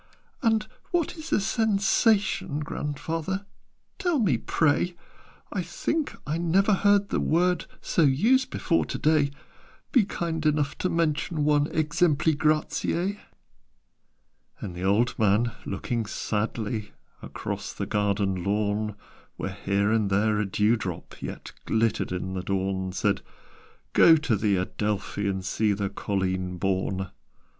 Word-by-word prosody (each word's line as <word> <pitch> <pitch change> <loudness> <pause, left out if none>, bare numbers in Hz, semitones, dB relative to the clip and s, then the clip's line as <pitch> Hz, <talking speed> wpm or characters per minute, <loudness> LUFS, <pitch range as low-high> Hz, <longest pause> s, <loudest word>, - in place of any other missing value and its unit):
"And 225 -4 +2 0.2
what 345 -2 0
is 315 -1 -8
a - - +4
Sensation, 205 - +2
Grandfather, 165 +6 -3 0.5
tell 355 -5 +1
me, 195 - +3
pray? 160 +8 +1 0.6
I - - 0
think 315 -2 -2
I 155 +2 -2
never 190 +5 +3
heard 200 +1 +3
the - - 0
word 180 +1 +1
So - - +1
used 220 - +4
before 165 - +1
to - - -4
day: 155 -2 +3 0.6
Be 245 - +5
kind 165 -5 -3
enough 150 -2 +1
to 185 - 0
mention 160 -1 0
one 150 -1 +3
'Exempli 155 0 +2
gratiâ.'" 160 +6 0 1.4
And 95 -4 -6
the 90 - -7
old 105 +7 +2
man, 110 +3 +3 0.2
looking 110 +3 -2
sadly 110 0 -3 0.3
Across - - -5
the - - -3
garden 100 -3 0
lawn, 105 +1 0 0.4
Where - - -4
here 100 +2 0
and 110 -3 +2
there 105 +2 +2
a 105 - 0
dew 105 +4 +2
drop 90 -5 -6
Yet - - -6
glittered 110 -3 +1
in 90 +1 -3
the 95 - -2
dawn, 95 0 -1
Said 100 +1 0 0.7
"Go 165 - +8
to 145 -7 +1
the 105 -1 +2
Adelphi, 100 +2 -2
And 95 -1 -2
see 105 +3 +1
the 100 0 -2
'Colleen 95 -2 -2
Bawn.' 95 +1 -1
120 Hz, 135 wpm, -26 LUFS, -, 1.4 s, Go